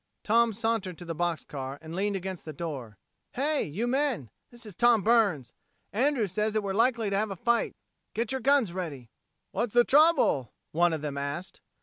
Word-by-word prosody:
Tom 230 +1 +4
sauntered 220 -5 -2
to 175 - -9
the 165 - -3
box 170 -1 -1
car 135 -1 -6
and 160 +1 -8
leaned 200 +2 0
against 190 -1 -5
the 155 - -7
door. 135 - -6 0.4
"Hey! 290 +3 +1
you 185 +11 -2
men! 255 - 0 0.2
This 240 -1 -11
is 210 - -8
Tom 235 +1 +4
Burns. 205 - +2 0.4
Andrews 240 - +1
says 210 +2 0
that 215 -1 0
we're 195 -1 -2
likely 230 -1 +2
to - - +1
have 215 +1 0
a 195 - -4
fight. 235 +5 0 0.4
Get 225 0 -1
your 265 -1 -2
guns 270 -9 +3
ready." 145 -10 -6 0.4
"What's 235 -1 -2
the 240 - +7
trouble?" 275 - +4 0.2
one 175 +2 +3
of 160 -2 -2
them 140 -2 -3
asked. 140 +6 -5
200 Hz, 195 wpm, -28 LUFS, 165-235 Hz, 0.4 s, the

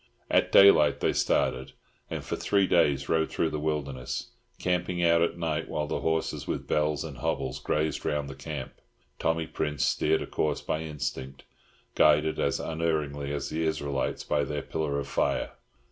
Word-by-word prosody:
At - - +3
daylight 100 -6 +7
they - - +1
started, 65 +1 0 0.4
and - - -5
for - - -2
three 100 -1 +2
days 70 -7 +2
rode 80 -1 +1
through 80 - 0
the 75 - -2
wilderness, 70 -4 -3 0.3
camping 90 -1 -1
out 85 -1 +4
at 85 0 +1
night, 80 -2 -2
while 75 - -1
the - - -2
horses 80 0 -1
with - - -3
bells 75 +1 +1
and 75 -5 -7
hobbles 65 0 -2
grazed 75 +1 -1
round 75 -1 -1
the 70 - -7
camp. 70 - -6 0.5
Tommy 80 0 0
Prince 75 -1 -1
steered 80 +1 +1
a - - -5
course 75 - -1
by 80 - -2
instinct, 65 -3 -5 0.5
guided 75 +1 +4
as - - +1
unerringly 75 -3 -2
as 70 -2 -3
the 80 +1 -2
Israelites 75 -4 -1
by 75 -1 +1
their 75 +1 -3
pillar 75 -3 -2
of 70 - -3
fire. - - 0
75 Hz, 170 wpm, -28 LUFS, 70-80 Hz, 0.5 s, daylight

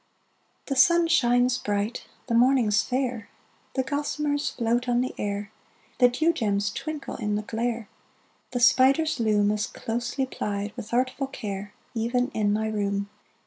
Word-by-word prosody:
The 275 - -2
sun 340 +6 +5
shines 245 -5 +3
bright, 205 +3 -2 0.2
the 235 - -3
morning's 235 -3 +4
fair, 250 -4 -2 0.5
The 260 - +1
gossamers 290 +1 -1
{233b}float 240 +1 0
on 240 0 +3
the 255 - -2
air, 205 +1 -3 0.5
The 245 -1 +7
dew 315 +7 +2
gems 205 -6 0
twinkle 310 -2 -5
in 210 -3 -1
the 210 - -2
glare, 230 0 -2 0.6
The 245 - -2
spider's 270 +5 +4
loom 210 -2 +3
Is 210 +1 -1
closely 240 +3 -3
plied, 205 -4 -4
with 225 -3 -8
artful 255 +3 0
care, 205 -5 -6 0.2
Even 245 +2 0
in 210 -6 0
my 220 +1 0
room. 200 -1 -1
240 Hz, 145 wpm, -26 LUFS, 210-260 Hz, 0.6 s, The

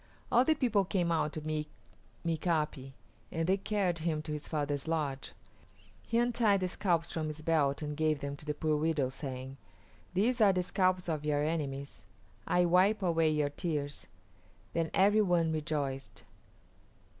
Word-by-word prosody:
All 245 - +6
the 315 +4 +3
people 235 -8 +2
came 180 -2 0
out 155 -2 +1
to 155 - -4
meet 155 0 -2 0.6
Mika´pi, 155 -5 -1 0.4
and 165 0 -1
they 190 +1 +3
carried 195 -4 -1
him 155 -2 -1
to 155 - -6
his 150 0 -5
father's 145 -1 -2
lodge. 150 -5 -2 0.7
He 230 - -1
untied 230 -4 +3
the 185 - +1
scalps 175 -3 0
from 160 -1 -2
his 155 0 -6
belt 150 -3 +1
and 150 0 -3
gave 155 -1 +1
them 140 0 -4
to 150 - -11
the 150 - -1
poor 155 +1 0
widows, 150 -4 0
saying, 130 -1 -6 0.6
"These 235 +5 +2
are 200 -2 +6
the 180 -1 0
scalps 185 0 +1
of 155 -3 -2
your 145 -1 +1
enemies; 140 -3 -3 0.5
I 180 0 +3
wipe 190 +4 +3
away 165 -3 +3
your 150 -2 +1
tears." 145 - -4 0.7
Then 165 -1 0
every 205 +3 +5
one 175 -5 +2
rejoiced. 145 -3 -3
160 Hz, 165 wpm, -32 LUFS, 150-180 Hz, 0.7 s, All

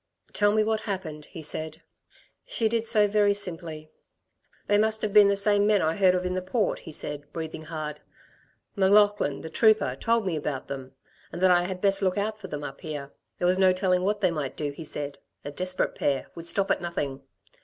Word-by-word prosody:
"Tell 205 0 +3
me 215 +1 +3
what 220 0 0
happened," 185 -8 -5
he 165 - -10
said. 155 +1 -3 0.6
She 225 - +1
did 230 0 -1
so 215 -2 +4
very 205 0 +3
simply. 165 -5 -6 0.7
"They 205 0 +3
must 220 0 +1
have 210 -2 -1
been 210 -1 +8
the 200 - +3
same 205 0 +3
men 210 -2 +3
I 160 +1 +1
heard 185 -2 +4
of 180 0 -1
in 180 - -1
the 185 - -1
Port," 200 +3 -1
he - - -10
said, 145 -1 -4
breathing 160 -1 -6
hard. 155 -2 -5 0.8
"M'Laughlin, 205 -6 +3
the 160 - -6
trooper, 215 - +3
told 230 +8 +1
me 180 -3 -1
about 145 -3 -3
them... 135 -1 -7 0.4
and 170 - -6
that 185 - +6
I 175 0 +4
had 185 0 -5
best 195 -1 +2
look 185 0 +1
out 215 +1 -2
for 195 - -8
them 150 -4 -5
up 140 -1 -7
here. 145 -3 -6 0.2
There - - -1
was 185 +1 +2
no 190 -1 +5
telling 185 -1 +1
what 205 +2 0
they 185 -3 +3
might 150 -5 -4
do, 145 -1 -2
he 150 +3 -9
said 145 -2 -5 0.3
a 145 - -4
desperate 185 +4 -1
pair 140 -2 -1
would 170 0 -4
stop 195 +3 +1
at - - +1
nothing. 145 -6 -3
185 Hz, 215 wpm, -26 LUFS, 155-205 Hz, 0.8 s, been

